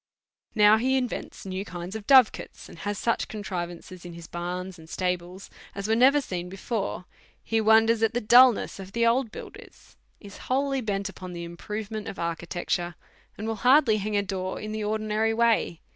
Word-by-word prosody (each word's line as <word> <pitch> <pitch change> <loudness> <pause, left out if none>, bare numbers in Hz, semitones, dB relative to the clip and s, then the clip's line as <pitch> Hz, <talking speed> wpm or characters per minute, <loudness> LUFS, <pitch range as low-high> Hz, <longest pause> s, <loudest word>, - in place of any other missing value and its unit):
Now* 210 0 +6
he 260 +4 +1
invents 250 -5 -4
new 190 0 -4
kind 180 -1 -7
of 215 -2 -7
dove 260 -5 +7
cots, - - -10
and 170 - -13
has 205 +2 -3
such 230 - 0
contrivances 180 -3 -6
in 175 -1 -9
his 170 0 -10
barns 180 +2 -5
and 160 0 -14
stables 180 +1 -3 0.2
as 200 +1 -4
were 220 - +2
never 265 +5 +5
seen 180 -8 -5
before; 195 0 -4 0.4
he 225 0 0
wonders 220 +1 +4
at 225 +1 +1
the - - +2
dulness 245 -1 +5
of 195 0 -9
the 235 0 +2
old 230 0 +2
builders, - - -12 0.2
is 200 -1 -12
wholly 270 +1 +1
bent 200 -3 -2
upon 185 -2 -8
the 170 0 -6
improvement 210 +5 -6
of - - -6
architecture, 175 +1 -3 0.4
and 215 - -5
will 225 -1 -2
hardly 250 -1 +5
hang 210 0 -1
a 200 - +1
door 190 -1 -4
in 215 - -6
the 215 0 -3
ordi 215 +1 -1
nary 215 +1 0
way. 230 -7 +1
210 Hz, 190 wpm, -26 LUFS, 180-225 Hz, 0.4 s, dove